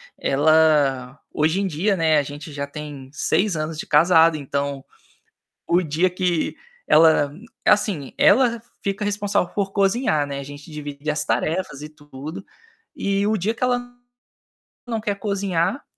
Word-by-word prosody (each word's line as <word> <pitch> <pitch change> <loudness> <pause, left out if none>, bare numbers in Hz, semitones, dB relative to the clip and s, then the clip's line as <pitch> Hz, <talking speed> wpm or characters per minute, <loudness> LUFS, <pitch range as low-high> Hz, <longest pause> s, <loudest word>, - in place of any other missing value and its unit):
Ela 145 -3 +2
hoje 160 +5 +1
em 200 - 0
dia 190 +4 0
não 165 - -2
é 155 -2 +4
a - - +2
gente 145 +2 -9
já 140 0 -4
tem 145 -2 -8
6 185 +6 0
anos 155 0 -4
de - - -6
casado, 165 +1 +5
então, 140 -1 -3 0.8
o 175 +1 +3
dia 165 +4 +1
que 180 -2 -1 0.3
ela 155 -2 +5 0.3
assim, 200 - +1
ela 235 -3 +4 0.2
fica 200 +1 -2
responsável 205 -3 -1
por 200 -1 -1
cozinhar, 195 - +1
né, 140 -1 -5
a - - -6
gente 145 +2 -11
divide 145 0 -5
as 150 - -1
tarefas 160 -4 -2
e 150 - -7
tudo, 150 +2 -9 0.5
e 200 +1 0
o 215 0 +1
dia 205 +4 -1
que 240 - -5
ela 245 -1 -1 0.9
não 230 -2 -2
quer 205 -2 -2
cozinhar, 200 - -1
160 Hz, 155 wpm, -22 LUFS, 145-200 Hz, 0.9 s, casado